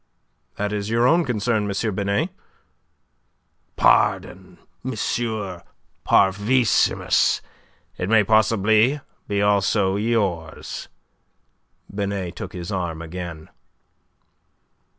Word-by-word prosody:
"That 105 +1 -2
is 105 0 -3
your 115 +1 +2
own 170 +7 +4
concern, 110 -3 0
M. 105 +2 -1
Binet." 100 +1 0 1.4
"Pardon, - - +2 0.3
M. 130 - -3 1.1
Parvissimus. 105 +5 +3 0.6
It 90 - -2
may 110 -1 +5
possibly 110 +5 +3 0.3
be 100 0 0
also 100 -1 +2
yours." 100 -7 -2 1.1
Binet 100 -3 -3
took 95 - -7
his 90 0 -6
arm 85 -4 -3
again. 85 -1 -7
100 Hz, 85 wpm, -22 LUFS, 95-110 Hz, 1.4 s, may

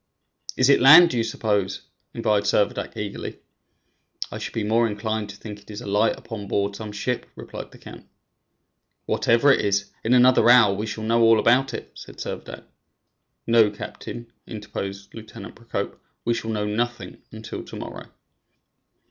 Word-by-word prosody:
"Is 130 - +4
it 140 - +5
land, 160 +6 +9
do 125 - -2
you 115 - +2
suppose?" 105 -4 -1 0.3
inquired 105 -3 0
Servadac, 100 0 0
eagerly. - - -5 0.9
"I - - -6
should - - -6
be 110 - -1
more 115 +2 +2
inclined 110 0 -3
to 100 - -9
think 105 0 -9
it 105 - -22
is 105 -1 -7
a 120 - -9
light 105 +2 +2 0.2
on 105 -3 -5
board 100 0 -1
some 105 0 -7
ship," 120 +4 -3
replied - - -9
the - - -16
count. - - -13 1.0
"Whatever 120 +5 +3
it - - +2
is, 100 0 0
in 120 +3 +3
another 125 -1 +5
hour 120 -5 +7
we 105 +3 -4
shall 110 +1 -5
know 115 +1 +2
all 115 0 +6
about 130 +4 +3
it," - - -8
said - - -12
Servadac. - - -7 0.8
"No, 115 -2 +5
captain," 115 +3 -9
interposed 100 -2 -7
Lieutenant 105 -4 -10
Procope; 115 -3 -5 0.3
"we 120 - +2
shall 115 -1 -4
know 105 -1 -1
nothing 120 +3 -3
until 110 0 -7
to - - -11
morrow." - - -8
110 Hz, 165 wpm, -23 LUFS, 105-115 Hz, 1.0 s, land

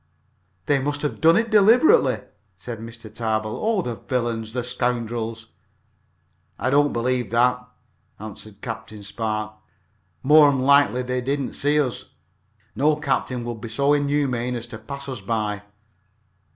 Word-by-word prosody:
"They 145 -1 +2
must 145 +2 -2
have 150 - -3
done 165 +3 +6
it 225 0 0
deliberately," 230 - +5 0.4
said 120 -3 -7
Mr. 115 +1 -10
Tarbill. 110 -1 -2
"Oh, 215 -4 +1
the 120 - -3
villains! 115 -1 -3
the 125 -1 -2
scoundrels!" 120 -2 -3 1.1
"I 130 - -1
don't 145 +1 +4
believe 125 -1 -1
that," 125 +2 +2 0.6
answered 105 -1 -10
Captain 110 -3 -7
Spark. 110 +1 -3 0.7
"More'n 145 -1 +6
likely 130 -3 +4
they 125 0 -2
didn't 140 +1 -2
see 145 +1 +2
us. 130 -5 -2 0.7
No 150 +2 +3
captain 135 -4 -2
would 120 -2 -5
be 115 - -6
so 140 +6 +2
inhuman 140 -4 0
as 120 -1 -5
to 110 - -7
pass 140 +5 -8
us 130 -5 -5
by." 105 0 -2
125 Hz, 140 wpm, -23 LUFS, 115-145 Hz, 1.1 s, done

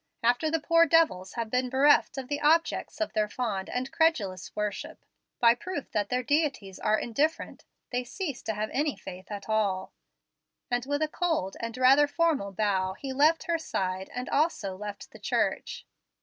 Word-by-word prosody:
After 245 +6 +2
the 325 +1 +1
poor 335 +2 +4
devils 285 - +3
have 230 -2 -4
been 250 0 +1
bereft 275 +2 +4
of 265 -2 -4
the 290 +1 -3
objects 325 +3 +2
of 320 - -2
their 215 -1 +1
fond 210 -6 -3
and 255 +1 -3
credulous 205 - +1
worship, 210 -1 -4 0.3
by 235 -1 +6
proof 315 +4 -6
that 205 -1 -1
their 250 0 0
deities 280 - 0
are 215 - +2
indifferent, 290 +9 -2 0.3
they 250 0 -1
cease 285 +1 -5
to 220 - -3
have 215 +1 -3
any 295 +1 0
faith 190 -1 -10
at 205 -2 -6
all"; 205 -4 0 0.8
and 245 +1 0
with 285 +2 0
a - - +1
cold 315 - -1
and 230 +1 -5
rather 270 +3 +6
formal 295 -10 +1
bow 190 -2 0
he 265 +7 -6
left 305 +5 +3
her 335 -1 0
side 190 -10 -3
and 250 0 -5
also 285 - 0
left 205 +1 -8
the - - -13
church. - - -1
250 Hz, 180 wpm, -28 LUFS, 205-300 Hz, 0.8 s, by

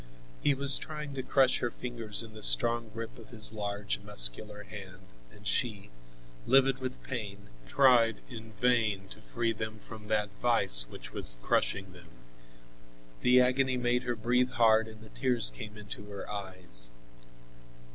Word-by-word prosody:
He 145 - +2
was 140 0 +7
trying 150 -2 -7
to 135 - -4
crush 130 0 +2
her 120 - -2
fingers 115 -4 -1
in 110 -1 -13
the 110 - -11
strong 115 - +5
grip 115 +2 -8
of 110 - -15
his 110 -2 +2
large, 105 -1 -4
muscular 105 - -1
hand, 95 -3 -11 0.3
and 105 +12 -18
she, 105 - -2 0.6
livid 135 0 +3
with 130 -1 -7
pain, 100 -5 -7 0.2
tried 120 -5 +4
in 115 -3 -10
vain 110 -4 0
to 110 - -13
free 115 +1 -2
them 110 0 -6
from 105 0 -12
that 105 -1 -1
vise 85 - +4
which - - -11
was - - 0
crushing 95 -1 -1
them. 85 -2 -16 1.1
The 125 +1 +5
agony 130 +1 +1
made 125 0 0
her 120 -1 -3
breathe 125 +3 0
hard 110 -1 +3
and 110 -1 -13
the 110 - -14
tears 125 -2 +2
came 105 -1 -10
into 105 0 -10
her 100 -1 -8
eyes. 95 -12 -6
110 Hz, 155 wpm, -29 LUFS, 100-125 Hz, 1.1 s, was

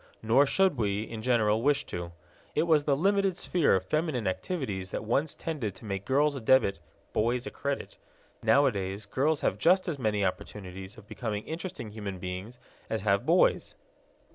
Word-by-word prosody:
Nor 125 +6 +4
should 190 -1 +3
we, 105 -2 0
in 110 -1 -7
general, 110 -2 +2
wish 145 +2 +2
to. 85 -1 -5 0.4
It 155 - +3
was 155 -3 +3
the 140 -2 +2
limited 195 +2 +2
sphere 170 - +2
of 95 0 -1
feminine 155 - -1
activities 95 - -3
that - - -4
once 140 +7 0
tended 130 - -4
to 110 - -13
make 100 -2 -4
girls 145 +2 +2
a 135 - -5
debit, 110 -4 +3 0.3
boys 120 +3 +1
a - - -5
credit. 140 - -4 0.4
Nowadays 105 -8 +2
girls 140 +8 0
have 95 - 0
just 185 - +4
as 155 -5 -2
many 105 -4 +1
opportunities 95 +2 -5
of 110 -2 -14
becoming 105 -3 -4
interesting 160 - -6
human 105 -3 -5
beings 95 +6 -6 0.3
as 110 - -1
have 100 0 +1
boys. - - +3
115 Hz, 170 wpm, -29 LUFS, 100-145 Hz, 0.4 s, Nor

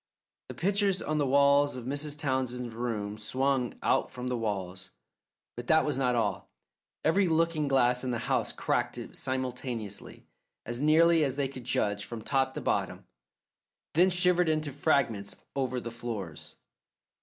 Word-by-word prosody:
The - - -7
pictures 200 0 +1
on 155 0 -1
the 145 - +1
walls 140 +1 +4
of 125 -2 -7
Mrs. 145 +2 -2
Townsend's 130 -4 -2
room 110 -3 -3
swung 130 +2 0
out - - +2
from 125 0 -5
the 125 - -1
walls. 95 -5 -4 0.7
But 120 0 -7
that 160 0 +4
was 150 - 0
not 125 -2 +1
all: 100 -5 -1 0.6
every 190 +4 +3
looking 160 -2 +1
glass 125 -2 +3
in 130 - -2
the 120 - 0
house - - 0
cracked - - -1 0.2
simultaneously 125 -5 -4 0.4
as 120 +2 -3
nearly 160 +2 +5
as 135 -3 0
they 140 -1 0
could 130 -2 -10
judge 105 -5 0
from 115 -2 -7
top 135 0 +1
to - - -4
bottom, - - -1 0.9
then 180 +4 +5
shivered 180 -1 +3
into 155 -2 0
fragments 125 -9 0 0.2
over 130 -2 -1
the 120 -1 -6
floors. 110 -9 -6
130 Hz, 155 wpm, -29 LUFS, 120-150 Hz, 0.9 s, nearly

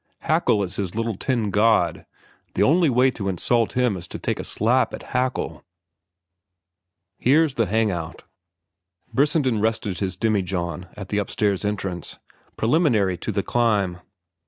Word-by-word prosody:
Haeckel 100 - +2
is 95 0 -5
his 95 -2 -3
little 115 -1 -1
tin 115 -1 -1
god. 105 -5 +2 0.5
The 100 - +3
only 165 - +4
way 130 +1 +4
to 100 -5 -4
insult 115 +5 +1
him 125 -4 +1
is 90 -1 -7
to - - -6
take - - -2
a - - -3
slap 125 +5 +1
at - - -11
Haeckel." 130 0 -1 1.6
"Here's 150 +3 +3
the 115 -4 0
hang 110 +2 +1
out." 85 -2 -6 0.9
Brissenden 135 -5 +2
rested 110 -3 -1
his 95 -3 -3
demijohn 90 -5 -1
at 100 -2 -7
the 105 - 0
upstairs 100 -1 0
entrance, 95 -4 -4 0.4
preliminary 110 - +2
to - - -3
the 100 -1 -1
climb. 105 -7 +1
105 Hz, 145 wpm, -23 LUFS, 95-120 Hz, 1.6 s, only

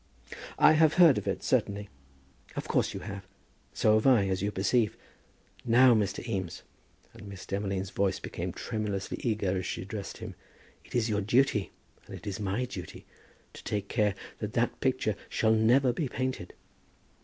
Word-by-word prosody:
"I 150 +1 +7
have 155 0 +4
heard 170 -6 +7
of - - -9
it, - - -2
certainly." 100 0 0 0.7
"Of - - -4
course - - +1
you - - -5
have. 100 -2 -7 0.4
So 105 - +3
have 110 +4 +3
I, 115 -7 +5
as 95 -1 -1
you 100 +1 0
perceive. 105 +3 +1 0.7
Now, 125 +2 +6
Mr. 105 +1 -1
Eames," 95 -7 -4 0.5
and 105 - -12
Miss 95 -2 -9
Demolines' 100 -1 -3
voice 100 -1 0
became - - -5
tremulously 105 -3 -4
eager 105 -5 0
as 95 -1 -2
she - - -4
addressed 100 +1 -6
him, - - -7 0.5
"it - - -11
is 120 -2 +2
your 105 -2 0
duty, 110 -1 +2 0.4
and - - -8
it - - -11
is 100 0 -4
my 100 +5 -1
duty, 95 -8 -8 0.5
to - - -11
take 100 -1 -3
care 105 -4 +1 0.2
that 105 -1 -4
that 120 0 0
picture 130 -5 0
shall 110 0 +2
never 120 +4 +4
be 145 +3 -2
painted." 130 -9 -4
105 Hz, 170 wpm, -29 LUFS, 100-120 Hz, 0.7 s, I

